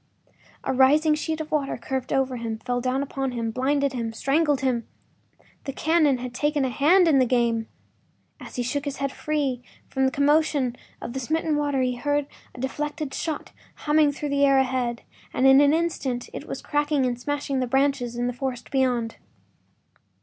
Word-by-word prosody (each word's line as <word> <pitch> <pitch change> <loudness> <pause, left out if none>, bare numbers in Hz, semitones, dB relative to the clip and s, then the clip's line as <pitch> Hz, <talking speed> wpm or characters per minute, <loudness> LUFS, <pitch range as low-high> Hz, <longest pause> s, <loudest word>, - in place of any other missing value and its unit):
A - - -1
rising 295 +4 +5
sheet 315 +1 -2
of 310 - -7
water 290 -3 0
curved 260 +1 -4
over 265 -2 +1
him, 230 -1 -4
fell 245 +1 -2
down 260 +2 0
upon 270 -2 -3
him, 230 -2 -2
blinded 275 +3 0
him, 230 -3 -3
strangled 285 +3 +1
him! 250 -3 0 0.8
The 275 - -4
cannon 310 -3 +3
had 250 0 -6
taken 295 +1 0
an 255 - -1
hand 340 +9 +4
in 290 -4 +5
the 255 - +4
game. 230 -2 +1 0.7
As - - -10
he 245 - -1
shook 280 +4 -2
his 280 -1 -4
head 275 -1 -2
free 280 -5 -2 0.3
from 265 -1 +1
the 265 - +2
commotion 285 -3 +2 0.3
of 235 - -6
the 265 - -3
smitten 315 +4 0
water 290 -2 0
he 250 -1 0
heard 290 +3 0 0.3
the 245 - -8
deflected 295 +1 -3
shot 320 -3 -4 0.2
humming 300 -1 +3
through 295 +1 -5
the 280 0 +2
air 275 -1 +5
ahead, 250 -2 0 0.3
and 255 - +2
in 270 +1 +8
an 285 0 +5
instant 300 -7 -1
it - - -7
was - - -6
cracking 295 -2 +1
and 245 -1 -1
smashing 285 0 -2
the 255 - 0
branches 270 -2 +1
in 240 0 -1
the 245 - -1
forest 250 -1 -5
beyond. 250 -4 0
270 Hz, 185 wpm, -25 LUFS, 250-295 Hz, 0.8 s, in